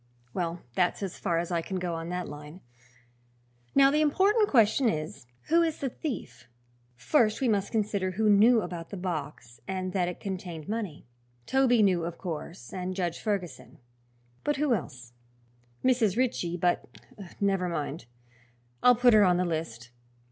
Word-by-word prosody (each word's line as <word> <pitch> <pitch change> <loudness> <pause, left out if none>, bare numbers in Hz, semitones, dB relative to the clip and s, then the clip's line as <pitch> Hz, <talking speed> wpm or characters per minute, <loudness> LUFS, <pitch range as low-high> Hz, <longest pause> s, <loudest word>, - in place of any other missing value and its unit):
Well, 170 -1 -3
that's 180 +7 +1
as 190 - -5
far 170 -4 0
as 170 +1 -2
I 170 -1 +1
can 190 +3 -4
go 180 -1 -2
on 165 0 -5
that 180 0 -3
line. 150 +4 -10 1.1
Now, 275 0 +6
the 300 +1 +2
important 400 +8 +3
question 235 +1 +4
is, 155 - -4 0.2
who 335 +2 +5
is 325 -2 0
the 270 - -2
thief? 120 - -6 0.5
First 210 - +2
we 265 - +1
must 205 -3 0
consider 205 -4 0
who 215 +3 +1
knew 215 +3 +6
about 170 -2 -6
the 200 - -6
box 150 -9 -5
and 185 -1 -3
that 180 -2 +1
it 180 - -5
contained 180 -5 -6
money. 210 -8 -4 0.4
Toby 250 -4 +3
knew, 180 -4 +3
of 170 0 -5
course, 165 -5 -7
and 185 0 -4
Judge 175 -3 -2
Ferguson. 200 -6 -4 0.7
But 295 - +1
who 290 -3 +2
else? 125 - -5 0.7
Mrs. 235 -6 +3
Ritchie, 205 -9 0
but 175 0 +1 0.6
Never 195 -3 +1
mind; 150 -4 -4 0.8
I'll 250 0 +6
put 245 0 +5
her 215 -1 +7
on 180 -2 +4
the 180 - +1
list. 155 -8 -4
185 Hz, 160 wpm, -28 LUFS, 165-225 Hz, 1.1 s, her